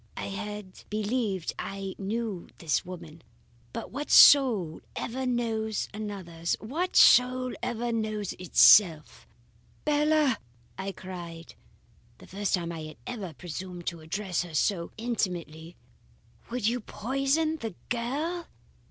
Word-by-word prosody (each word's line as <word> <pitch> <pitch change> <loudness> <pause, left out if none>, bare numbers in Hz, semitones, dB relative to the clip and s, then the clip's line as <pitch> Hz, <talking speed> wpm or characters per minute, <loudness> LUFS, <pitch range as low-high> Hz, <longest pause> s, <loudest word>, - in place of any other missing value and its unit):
"I - - -4
had 210 -1 -7
believed 210 -3 -1
I 195 -1 -4
knew 205 -2 -3
this 160 -4 0
woman; 170 -3 -10 0.5
but - - -6
what 285 +4 -5
soul 225 - +7
ever 260 +2 -3
knows 225 -3 -1
another's? 190 -6 -3
What 320 +12 -3
soul 255 +1 +6
ever 240 0 -2
knows 215 -3 -2
itself? 175 -2 +5 0.6
"'Bella!' 300 -3 +3 0.4
I 190 +1 -4
cried; 175 -3 -9 0.6
the - - -14
first 200 +1 -1
time 170 -2 -4
I 165 - -6
had 155 - -10
ever 200 -10 -6
presumed 175 +1 -7
to 170 - -10
address 180 +2 -2
her 175 -3 -7
so 170 +1 +1
intimately. 175 -8 -3 0.7
'Would 245 -2 -3
you 240 +2 +1
poison 275 +8 0
the 225 - -6
girl? 290 +9 -2
210 Hz, 120 wpm, -28 LUFS, 180-245 Hz, 0.7 s, soul